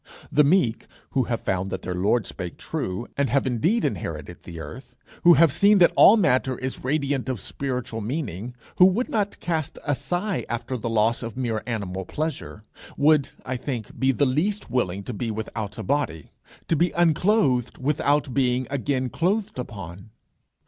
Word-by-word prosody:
The 150 - +5
meek 145 -7 +2 0.2
who 130 -3 +1
have 115 -1 -2
found 95 0 -1
that 95 -1 -5
their 90 - -3
Lord 100 +5 +1
spake 90 -3 -6
true, 95 +5 -4
and 140 -1 +1
have 140 0 +2
indeed 160 - +1
inherited 85 -3 -4
the 85 -2 -9
earth, 85 - -9 0.3
who 175 0 +8
have 155 -1 +5
seen 200 +5 +5
that 175 -2 +5
all 220 - +8
matter 130 - +2
is 130 0 -5
radiant 140 -1 0
of 130 -4 -2
spiritual 125 0 -4
meaning, 120 - -4 0.2
who 180 - +8
would 215 +7 0
not 205 -2 -1
cast 160 -4 -2
a 145 - +2
sigh 175 - -2
after 120 +2 -3
the 115 -1 -3
loss 115 +1 +2
of 115 -1 -6
mere 115 -4 -1
animal 100 -5 -3
pleasure, 150 - -4 0.3
would, 150 -1 +4 0.2
I 130 0 -2
think, 120 -4 -5
be 130 0 +3
the 140 +2 +2
least 160 - -1
willing 100 -6 -1
to 125 - -5
be 115 +2 -3
without 110 -1 -5
a 110 - -4
body, 95 - -2 0.4
to 165 - +2
be 175 +3 +3
unclothed 165 - +2
without 145 0 +1
being 125 0 +1
again 135 -2 -1
clothed 200 0 -1
upon. 95 -4 -8
130 Hz, 175 wpm, -24 LUFS, 110-155 Hz, 0.4 s, who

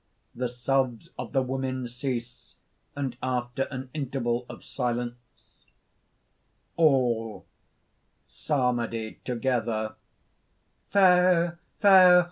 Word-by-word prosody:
_ - - -47 0.3
The 125 0 -2
sobs 125 -1 -1
of 125 -3 -6
the 135 - +2
women 130 -1 -3
cease 120 -1 -6 0.4
and 135 -4 -3
after 125 +1 -2
an 130 -1 -7
interval 125 -4 -2
of - - -10
silence,) 120 -1 -3 1.6
ALL 125 -8 +2 0.8
(psalmody 120 -6 -2
together): 115 -3 -1 1.0
"Fair! 180 -3 +4 0.2
fair! 185 -3 +8
125 Hz, 90 wpm, -27 LUFS, 120-140 Hz, 1.6 s, fair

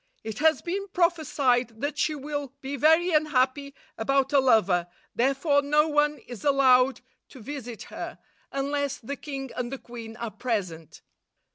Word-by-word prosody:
"It 220 -1 -6
has 315 +1 +3
been 395 +3 -3
prophesied 280 - +1
that 290 +1 -2
she 310 - +1
will 290 -1 -5
be 275 +1 -5
very 320 +5 +4
unhappy 280 -2 +1 0.2
about 275 +4 +1
a 280 - +6
lover, 195 -9 +3 0.3
therefore 275 +3 +2
no 300 +2 +3
one 295 0 +2
is 240 -4 -9
allowed 260 -2 +4 0.3
to 265 - -13
visit 245 -2 -7
her, - - -6 0.3
unless 280 0 -1
the 280 +5 -6
king 270 -3 -6
and 245 0 -3
the 270 - -4
queen 230 -2 -10
are 235 -2 -4
present." 185 - -4
275 Hz, 150 wpm, -26 LUFS, 245-295 Hz, 0.3 s, a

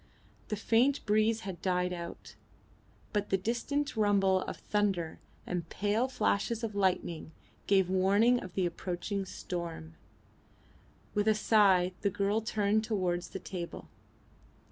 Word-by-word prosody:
The 215 - -2
faint 235 +6 +2
breeze 215 +1 +2
had 190 -4 -6
died 180 -1 0
out, 170 -1 -7 0.8
but 205 -1 0
the 195 - +3
distant 245 +8 -1
rumble 200 -3 +3
of - - -5
thunder 195 -6 -1 0.3
and 175 -2 -3
pale 210 +5 0
flashes 235 -2 0
of 220 -2 -2
lightning 180 -5 -1 0.3
gave 190 -2 +4
warning 200 +6 +4
of 185 -5 -9
the 190 - +1
approaching 180 +3 -3
storm. 170 - -6 1.2
With 205 +1 +1
a 215 - +5
sigh 195 -5 +4
the 200 - +2
girl 200 +3 0
turned 215 -1 +1
towards 180 -5 -1
the - - -5
table. 175 -2 -7
200 Hz, 130 wpm, -31 LUFS, 180-215 Hz, 1.2 s, a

